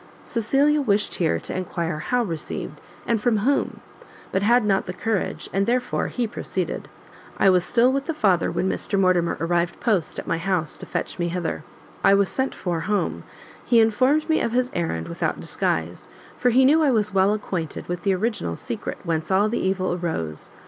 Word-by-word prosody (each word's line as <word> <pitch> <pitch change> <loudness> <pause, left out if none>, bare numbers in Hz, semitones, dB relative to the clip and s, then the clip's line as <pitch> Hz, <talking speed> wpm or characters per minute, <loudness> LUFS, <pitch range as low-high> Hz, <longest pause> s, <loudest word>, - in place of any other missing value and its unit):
Cecilia 280 +6 +2
wished 210 -5 +1
here 165 -3 +1
to - - -4
enquire 170 -4 -3
how 245 +9 0
received, 165 -7 -5 0.2
and 230 -3 0
from 230 -1 +2
whom, 265 +8 0 0.5
but 190 - +1
had 235 +2 +4
not 195 -2 +1
the 180 - -4
courage, 220 -2 -2
and 195 +1 +1
therefore 250 +1 0
he 245 - -2
proceeded. 185 -5 -3 0.5
"I 195 - +5
was 180 -1 +3
still 245 +6 +3
with 275 0 -2
the 325 - -2
father 195 - +2
when 185 - -1
Mr 195 +1 0
Mortimer 180 -3 +2
arrived 170 +1 0
post 205 -9 0
at - - -4
my 165 - -1
house 180 -3 -1
to - - -9
fetch - - -4
me 175 - 0
hither. 175 -1 -3 0.4
I 200 - +6
was 200 -1 +2
sent 265 0 -1
for 175 -3 -2
home; 200 +5 -1 0.4
he 235 - +4
informed 255 +7 +3
me 315 - +2
of 230 - -1
his 250 +1 +1
errand 85 - -2
without - - -2
disguise, 80 -3 -2 0.3
for 250 - +2
he 260 +2 +5
knew 305 +4 +5
I 300 - +4
was 215 -4 +1
well 195 +1 +4
acquainted 185 -6 -3
with 175 0 -3
the 195 -1 +2
original 200 - -2
secret - - -5
whence 160 -1 -2
all 200 +3 +3
the 235 - -1
evil 190 -1 0
arose. 160 - -3
195 Hz, 190 wpm, -23 LUFS, 175-235 Hz, 0.5 s, I